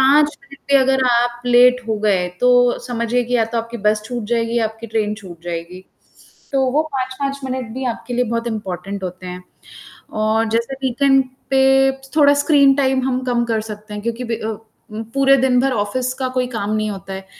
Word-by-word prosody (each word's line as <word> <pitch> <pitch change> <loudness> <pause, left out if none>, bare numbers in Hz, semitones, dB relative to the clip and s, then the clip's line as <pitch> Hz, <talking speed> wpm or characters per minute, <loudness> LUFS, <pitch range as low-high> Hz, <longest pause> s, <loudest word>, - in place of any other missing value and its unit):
5 290 +3 +4
minute 275 0 -15
भी - - +8
अगर 265 0 +2
आप 240 0 +1
लेट 250 +1 +5
हो 220 - 0
गए 190 -4 +1
तो 245 0 +4
समझिए 240 0 0
कि 245 +1 0
या 230 - +3
तो 230 +1 -3
आपकी 230 +1 -5
बस 210 0 +1
छूट 240 -3 -4
जाएगी 230 0 +1
या 225 - +1
आपकी 225 +1 -6
ट्रेन 215 -1 -1
छूट 180 -6 -12
जाएगी। 175 +2 -6 0.7
तो 270 -1 +2
वो 300 +3 +3
5-5 270 +1 -3
मिनट 255 -2 -4
भी 260 0 -4
आपके 245 +2 -8
लिए 250 +1 +2
बहुत 230 +1 -2
इम्पोर्टेंट 200 -3 -5
होते 185 0 -7
हैं 180 0 -7 0.8
और 220 +1 +2
जैसे 230 +4 -1
वीकेंड 270 +1 +3 0.3
पे 270 0 +4 0.2
थोड़ा 285 -2 +6
स्क्रीन 285 -1 +4
टाइम 265 -1 +1
हम 255 0 -1
कम 240 -1 0
कर 225 -2 -1
सकते 210 0 -9
हैं, 210 0 -6
क्योंकि 235 +2 -3
ब 235 - -5
अ, 220 0 -4 0.5
पूरे 275 0 +5
दिन 250 -1 +3
भर 270 +1 +2
ऑफ़िस 245 +5 -1
का 260 - 0
कोई 255 -1 -1
काम 225 -5 -4
नहीं 215 0 -1
होता 195 0 -7
है, 190 0 -7
240 Hz, 200 wpm, -19 LUFS, 215-265 Hz, 0.8 s, भी